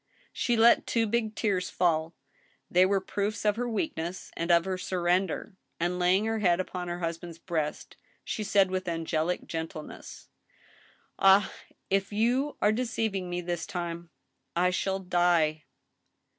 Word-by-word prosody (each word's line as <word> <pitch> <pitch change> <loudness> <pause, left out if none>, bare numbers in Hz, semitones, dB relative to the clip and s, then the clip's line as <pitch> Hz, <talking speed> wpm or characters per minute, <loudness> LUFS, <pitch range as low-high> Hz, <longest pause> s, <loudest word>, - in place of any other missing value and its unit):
She 240 -2 0
let 230 +1 +5
two 230 -1 +2
big 220 0 -1
tears 195 -5 0
fall; 165 -2 0 0.6
they 180 +1 +5
were 195 0 +2
proofs 205 +3 -3
of 210 -1 +3
her 245 +1 -2
weakness 190 - -3
and 170 +1 -3
pf 170 -1 +5
her 190 -1 -2
surrender; 185 +2 -1 0.2
and, 175 +2 -1
laying 185 +4 +3
her 225 0 -1
head 175 -4 +3
upon 180 -1 -4
her 175 0 -3
husband's 170 -1 -5
breast, 160 -3 -4 0.3
she 215 - -3
said, 195 -2 +3
with 185 0 -2
angelic 165 0 -1
gentleness: 160 -1 -7 0.9
Ah! 195 +1 +5 0.4
if 195 +1 +1
you 245 +7 +1
are 210 - +5
deceiving 220 -5 -2
me 175 0 -2
this 175 -1 -3
time, 170 -1 -5 0.5
I 180 +1 +3
shall 190 +1 0
die." 175 -5 +1
185 Hz, 145 wpm, -28 LUFS, 170-205 Hz, 0.9 s, let